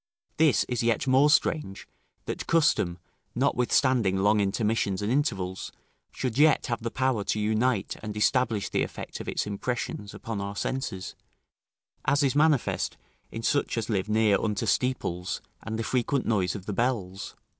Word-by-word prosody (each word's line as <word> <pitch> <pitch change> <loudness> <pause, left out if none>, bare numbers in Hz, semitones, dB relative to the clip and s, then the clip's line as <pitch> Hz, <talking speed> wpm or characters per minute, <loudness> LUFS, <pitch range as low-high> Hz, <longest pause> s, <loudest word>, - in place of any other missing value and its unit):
This 155 -3 +4
is 125 -2 -2
yet 115 +1 +1
more 135 +3 +5
strange, 150 - +1 0.4
that - - -5
custom, 150 - +2 0.4
notwithstanding 125 -5 +2
long 105 +2 +3
intermissions 100 -1 0
and 105 - 0
intervals, 95 -10 -1 0.4
should 130 0 -3
yet 155 0 +5
have 115 -2 -2
the 115 - -2
power 130 -4 0
to 105 - 0
unite 110 +1 +1
and 105 -1 -6
establish 115 -1 +2
the - - 0
effect - - -5
of - - -7
its - - -1
impressions 105 0 -4
upon 110 -3 -5
our 100 +1 -5
senses, 100 -5 -3 0.9
as 145 +1 +2
is 135 - +2
manifest 150 -3 +2 0.3
in 115 - -6
such 145 0 +1
as 115 0 -2
live 100 0 -1
near 105 -2 +3
unto 105 -3 -1
steeples 90 -9 -1 0.2
and 110 - -4
the 115 - -2
frequent 130 +3 0
noise 100 -4 +1
of 95 -3 -7
the 105 - -3
bells. 100 -5 -2
115 Hz, 155 wpm, -27 LUFS, 100-130 Hz, 0.9 s, more